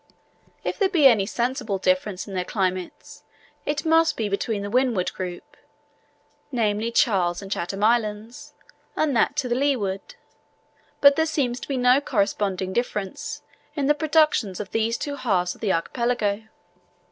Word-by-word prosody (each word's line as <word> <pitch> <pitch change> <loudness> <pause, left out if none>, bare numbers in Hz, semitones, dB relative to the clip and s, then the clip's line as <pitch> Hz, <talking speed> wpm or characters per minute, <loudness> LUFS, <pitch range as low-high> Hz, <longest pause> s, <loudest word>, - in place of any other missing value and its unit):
If - - -3
there 395 -2 +3
be 335 -7 +3
any 220 -7 +6
sensible 240 -4 -1
difference 185 +1 0
in 200 - -8
their 180 -1 -1
climates, 185 -2 -3 0.4
it 300 +2 -1
must 325 0 +3
be 220 -2 -1
between 200 +1 -2
the 205 - -4
Windward 245 -7 +1
group 180 -1 -7 1.0
(namely, 220 -2 0
Charles 190 -9 +2
and 195 -1 -9
Chatham 195 +2 -3
Islands), 230 +6 -1 0.4
and 300 -4 +1
that 235 - +2
to 285 -3 -1
leeward; 240 -8 -1 0.9
but 280 0 +7
there 320 0 +2
seems 255 -6 -1
to - - -9
be 275 - -2
no 250 +2 +4
corresponding 195 -6 -1
difference 210 -5 -3 0.3
in 285 -3 -1
the 295 - +5
productions 300 - +2
of 205 -1 -6
these 225 +1 0
two 285 +2 -4
halves 185 -8 0
of - - -20
the 205 - +1
archipelago. 215 +3 -1
225 Hz, 150 wpm, -24 LUFS, 195-275 Hz, 1.0 s, but